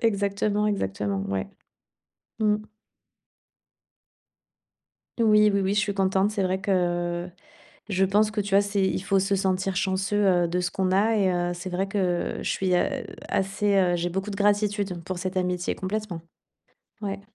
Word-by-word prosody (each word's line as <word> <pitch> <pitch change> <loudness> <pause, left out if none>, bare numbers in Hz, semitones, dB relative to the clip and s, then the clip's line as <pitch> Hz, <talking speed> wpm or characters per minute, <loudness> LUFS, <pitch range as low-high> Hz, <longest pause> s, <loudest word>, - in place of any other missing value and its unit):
Exactement, 205 -1 +1
exactement, 100 - -1
ouais. 95 -1 -2 0.9
Mmh. 210 -1 +3 2.6
Oui, 210 -2 +5
oui, 200 - +2
oui, 195 +1 0
je - - +2
suis 205 -1 -1
contente. 195 +1 +2
C'est 205 -2 -1
vrai 185 +1 0
que 175 -2 0 0.6
je 190 -1 +2
pense 210 +3 +3
que, 215 - -3
tu 200 0 -6
vois? 195 - +6
C'est 200 -1 -1
il 190 - 0
faut 195 -1 +2
se 195 +1 +1
sentir 190 0 0
chanceux, 190 +2 0 0.3
heu, - - +1
de 180 +2 -1
ce 175 - -1
qu'on 185 0 -1
a, 215 +4 +3
et 195 -3 +2
heu, 175 0 0
c'est 175 +2 -6
vrai 185 +2 -1
que 185 -3 -1
je - - -2
suis, 185 -2 +1
heu, 175 - +2 0.4
assez, 200 +1 0
heu 180 -2 +3
j'ai 175 +1 -1
beaucoup 195 +3 -3
de 200 - -4
gratitude 205 -3 +1
pour 185 +1 -4
cette 185 +1 -3
amitié, 180 -1 -1
complètement. 190 -3 -4 0.8
Ouais. 200 -1 -3
195 Hz, 165 wpm, -25 LUFS, 180-205 Hz, 2.6 s, vois